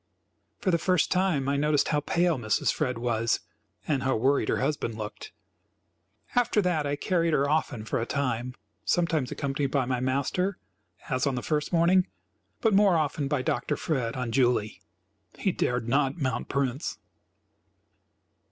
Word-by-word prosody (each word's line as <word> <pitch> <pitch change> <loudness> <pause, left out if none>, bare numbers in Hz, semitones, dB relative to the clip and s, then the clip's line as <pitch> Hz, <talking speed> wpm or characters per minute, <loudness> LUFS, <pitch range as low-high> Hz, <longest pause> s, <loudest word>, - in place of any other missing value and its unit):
For 185 - 0
the 170 - +2
first 180 -1 +2
time 180 -8 +1
I 140 0 +1
noticed 145 0 +2
how 150 - +2
pale 170 0 +1
Mrs. 110 -2 +1
Fred 125 -5 -1
was 115 -1 0 0.5
and 140 -4 +1
how 130 0 +1
worried 135 +5 +2
her - - +2
husband 140 -6 -1
looked. 105 -1 -7 1.0
After 245 -3 +2
that 175 -7 +1
I 145 - 0
carried 165 +1 0
her 140 -1 +2
often 145 -7 -1
for 115 - -1
a - - -1
time, 125 -3 -2 0.3
sometimes 165 -7 +1
accompanied 140 0 -1
by 135 -1 +1
my 125 0 -1
master, 140 +9 0 0.5
as 130 +2 +1
on 135 - 0
the 125 - -3
first 150 -2 -1
morning, 180 +2 +4 0.5
but 225 -2 +3
more 195 -3 +5
often 150 -2 -1
by 140 -2 0
Dr. 120 - -1
Fred 125 -7 -1
on 125 -3 -3
Julie. 120 -4 +1 0.6
He 195 - +1
dared 125 -7 -1
not 135 +3 +1
mount 130 -6 -2
Prince. 140 0 -1
140 Hz, 160 wpm, -27 LUFS, 125-165 Hz, 1.0 s, more